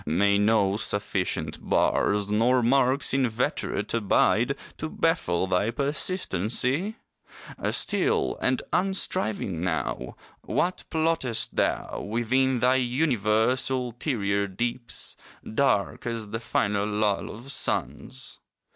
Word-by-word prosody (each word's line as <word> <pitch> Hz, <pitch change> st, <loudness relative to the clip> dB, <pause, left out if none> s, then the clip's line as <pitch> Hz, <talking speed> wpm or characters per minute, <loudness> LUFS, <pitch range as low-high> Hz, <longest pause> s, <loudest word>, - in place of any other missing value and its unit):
May 100 Hz, +6 st, +3 dB
no 105 Hz, -2 st, +3 dB
sufficient 95 Hz, -6 st, -2 dB
bars, 105 Hz, 0 st, +1 dB
Nor 120 Hz, +4 st, +3 dB
marks 130 Hz, +3 st, +3 dB
inveterate 125 Hz, -5 st, 0 dB
abide 115 Hz, +3 st, +2 dB, 0.2 s
To 160 Hz, -, -3 dB
baffle 95 Hz, -, +1 dB
thy 95 Hz, +3 st, +1 dB
persistency? 140 Hz, -, 0 dB, 0.7 s
Still -, -, +1 dB
and -, -, +1 dB
unstriving 180 Hz, -, 0 dB
now, 85 Hz, -4 st, -2 dB, 0.3 s
What 180 Hz, +2 st, -1 dB
plottest 160 Hz, -9 st, 0 dB
thou, -, -, 0 dB
Within 120 Hz, +3 st, +1 dB
thy 125 Hz, +1 st, +4 dB
universe 125 Hz, -3 st, +1 dB
ulterior 120 Hz, -5 st, -1 dB
deeps, 120 Hz, +5 st, -3 dB, 0.3 s
Dark 110 Hz, -3 st, 0 dB
as 115 Hz, -3 st, -4 dB
the 115 Hz, -, -3 dB
final 105 Hz, -3 st, 0 dB
lull 105 Hz, -1 st, 0 dB
of 120 Hz, +6 st, -7 dB
suns? 65 Hz, -, -2 dB
115 Hz, 100 wpm, -26 LUFS, 100-130 Hz, 0.7 s, thy